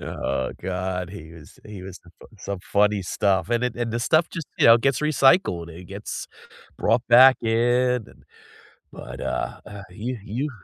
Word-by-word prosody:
Oh 65 - -3
god. 90 0 -3
He 80 -5 -11
was 80 -3 -15
he 105 -3 -9
was 95 0 -9
th 85 0 -21 0.3
some 100 +1 -5
funny 105 +1 +1
stuff. 95 +1 0
And 120 +1 +1
it 125 -1 -3
and 120 -2 -3
the 120 - -2
stuff 155 +7 +2
just, 165 -5 -6
you - - +5
know, 115 0 +9
gets 130 +1 0
recycled. 150 - +2
It 85 +2 -11
gets 100 +3 -7 0.5
brought 120 - +1
back 130 +2 +8
in, 120 +1 +1
and - - -20 0.7
but, - - -9
uh, 60 +1 -3
uh, 100 -1 -9
you 115 +7 -5
you 130 +9 -3
105 Hz, 175 wpm, -23 LUFS, 90-125 Hz, 0.7 s, know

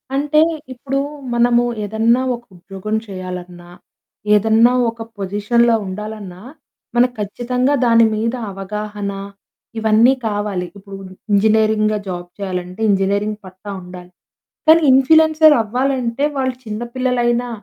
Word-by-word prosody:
అంటే 295 +2 +2 0.3
ఇప్పుడు 270 +2 -3 0.3
మనము 240 0 +3 0.2
ఏదన్నా 225 +4 +2
ఒక 235 - -13
ఉద్యోగం 195 +4 -5
చేయాలన్నా, 180 -2 -8 0.6
ఏదన్నా 225 +3 +4 0.2
ఒక 230 0 -9 0.2
పొజిషన్‌లో 210 +4 +1
ఉండాలన్నా 200 -1 -7 0.5
మనకు 245 +1 +3
ఖచ్చితంగా 250 +6 -1
దాని 230 -1 +5
మీద 230 +3 -1 0.2
అవగాహన 205 +1 -5 0.7
ఇవన్నీ 220 +4 +4
కావాలి. 205 -4 -2
ఇప్పుడు 195 0 -10 0.3
ఇంజినీరింగ్‌గా 215 +1 +3
జాబ్ 175 -1 -5
చేయాలంటే 185 0 -5
ఇంజనీరింగ్ 200 +2 0
పట్టా 185 +2 -10
ఉండాలి. 180 0 -11 0.6
కానీ 325 +1 +7
ఇంప్ల్యూయన్సర్ 315 +3 +5
అవ్వాలంటే 255 +2 -1
వాళ్ళు 260 -1 -1
చిన్న 215 +1 -5
పిల్లలైనా, 245 -1 0
215 Hz, 105 wpm, -18 LUFS, 195-245 Hz, 0.7 s, కానీ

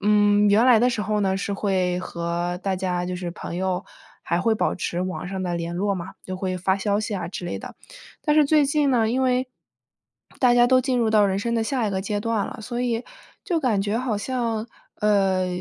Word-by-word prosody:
嗯， 205 0 +4
原 220 +5 +5
来 240 -3 +7
的 245 +2 +3
时 230 - -2
候 210 0 0
呢， 190 -1 +1
是 200 +1 -2
会 185 -3 0
和 175 0 -3
大 195 -1 -1
家 180 -1 -2
就 180 0 -3
是 175 -1 -4
朋 170 - -7
友 185 0 -1 0.4
还 170 - 0
会 225 +3 +2
保 - - 0
持 175 -1 -3
网 185 0 -3
上 190 -1 -4
的 175 -1 -2
联 170 0 -3
络 200 +2 0
嘛， 180 0 -5
就 185 0 -6
会 185 -1 -3
发 190 +2 +1
发 - - -4
消 205 +1 0
息 215 -1 -3
啊 175 -3 -3
之 180 - -6
类 - - -3
的。 - - -9 0.5
但 300 -1 +2
是 300 - +6
最 295 -1 +4
近 285 -1 +2
呢， 230 -4 +2
因 260 +3 0
为 255 0 +1 0.9
大 250 -2 +5
家 240 0 +5
都 255 0 +5
进 255 0 0
入 230 -2 +2
到 210 -1 +5
人 195 0 +1
生 235 +3 -1
的 225 - +1
下 240 -1 -1
一 - - -1
个 190 -1 -2
阶 205 +1 -2
段 225 -1 0
了， - - -8
所 240 +3 -4
以， 235 -1 -1 0.4
就 350 -5 0
感 225 -8 +1
觉 205 +2 -1
好 240 -4 -1
像， 230 -1 -2 0.3
呃， 195 -3 +2
205 Hz, 255 characters per minute, -24 LUFS, 185-235 Hz, 0.9 s, 来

